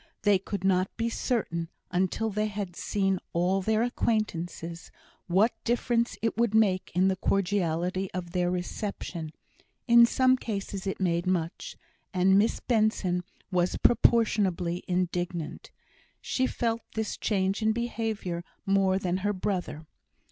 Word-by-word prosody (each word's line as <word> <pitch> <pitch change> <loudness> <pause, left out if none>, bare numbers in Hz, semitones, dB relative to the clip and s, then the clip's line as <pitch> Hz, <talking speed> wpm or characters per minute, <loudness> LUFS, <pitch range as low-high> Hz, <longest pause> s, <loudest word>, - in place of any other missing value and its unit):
They 205 -2 +4
could 195 0 -5
not 185 -1 +2
be 230 0 0
certain, 170 -10 -1 0.2
until 190 +5 0
they 210 +1 0
had 200 -4 -5
seen 195 -1 0
all 180 +3 +2
their 220 +3 +2
acquaintances, 175 -8 -2 0.4
what 195 +7 +3
difference 240 0 0
it 225 - 0
would 235 -2 +2
make 195 -4 +2
in 185 +1 +4
the 190 - +2
cordiality 185 -1 0
of 175 -2 -5
their 175 0 +1
reception: 180 -2 -4 0.6
in 235 0 +8
some 255 +1 +3
cases 200 -4 -4
it 195 - -2
made 175 -1 0
much; 170 -3 -2 0.4
and 190 +1 +4
Miss 220 +3 +1
Benson 215 -6 +1 0.3
was 180 -1 +1
proportionably 195 -7 +2
indignant. 175 -2 -2 0.5
She 260 0 0
felt 230 -2 -1
this 220 -1 -2
change 195 -1 0
in 220 0 +3
behaviour 220 -6 -3 0.2
more 195 -1 +3
than 185 -2 -1
her 205 +2 0
brother. 180 -5 -3
195 Hz, 135 wpm, -28 LUFS, 180-220 Hz, 0.6 s, in